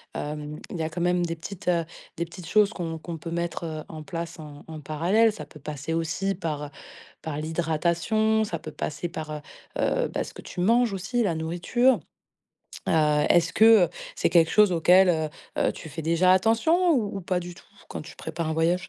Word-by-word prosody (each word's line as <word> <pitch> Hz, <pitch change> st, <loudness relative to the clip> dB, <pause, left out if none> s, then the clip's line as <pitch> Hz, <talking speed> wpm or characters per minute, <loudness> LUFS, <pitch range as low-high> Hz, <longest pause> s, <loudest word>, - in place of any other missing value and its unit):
Hem, 150 Hz, 0 st, -5 dB
il -, -, -4 dB
y 165 Hz, -, -3 dB
a 160 Hz, -, -2 dB
quand 170 Hz, +2 st, -5 dB
même 175 Hz, 0 st, +2 dB
des 165 Hz, -1 st, -2 dB
petites, 180 Hz, +3 st, -9 dB
heu, 170 Hz, -2 st, +2 dB, 0.3 s
des 170 Hz, -, -1 dB
petites 170 Hz, 0 st, -11 dB
choses 210 Hz, +1 st, +4 dB
qu'on 165 Hz, -3 st, -4 dB
qu'on 165 Hz, +1 st, -7 dB
peut 165 Hz, -, -7 dB
mettre, 170 Hz, 0 st, -3 dB
heu, 155 Hz, -1 st, -5 dB
en 155 Hz, -1 st, -7 dB
place 170 Hz, +1 st, -6 dB
en 150 Hz, -2 st, -10 dB
en 160 Hz, -1 st, -7 dB
parallèle. 175 Hz, +10 st, +2 dB
Ça 150 Hz, -, -8 dB
peut 150 Hz, -, -15 dB
passer 150 Hz, +2 st, -5 dB
aussi 165 Hz, +4 st, -1 dB
par 150 Hz, -5 st, -4 dB, 0.5 s
par 150 Hz, -2 st, -4 dB
l'hydratation, 170 Hz, +8 st, +1 dB
ça 175 Hz, -5 st, -3 dB
peut 155 Hz, 0 st, -9 dB
passer 155 Hz, +3 st, -4 dB
par, 160 Hz, -3 st, -6 dB
heu 150 Hz, -1 st, -5 dB, 0.4 s
heu, -, -, +1 dB
bah, -, -, -2 dB
ce -, -, -10 dB
que -, -, -10 dB
tu -, -, -9 dB
manges 235 Hz, +3 st, +3 dB
aussi, 195 Hz, +6 st, -1 dB
la 175 Hz, -5 st, 0 dB
nourriture. 175 Hz, +9 st, +2 dB, 0.9 s
Heu, -, -, +2 dB, 0.4 s
est-ce 170 Hz, -1 st, +4 dB
que, 220 Hz, -, +5 dB, 0.2 s
heu, -, -, -11 dB, 0.3 s
c'est -, -, +1 dB
quelque 165 Hz, -2 st, +5 dB
chose 210 Hz, -2 st, +6 dB
auquel, 180 Hz, +3 st, +5 dB
heu 160 Hz, -3 st, +1 dB, 0.3 s
heu, -, -, +2 dB
tu -, -, -10 dB
fais 160 Hz, +2 st, -6 dB
déjà 170 Hz, +3 st, +4 dB
attention 275 Hz, -, +3 dB
ou 210 Hz, -7 st, 0 dB
ou -, -, -4 dB
pas 180 Hz, 0 st, 0 dB
du 175 Hz, 0 st, -8 dB
tout -, -, -16 dB, 0.2 s
quand -, -, -6 dB
tu 160 Hz, -, -11 dB
prépares 165 Hz, -2 st, -4 dB
un -, -, 0 dB
voyage? 175 Hz, +3 st, +1 dB
170 Hz, 215 wpm, -26 LUFS, 160-190 Hz, 0.9 s, chose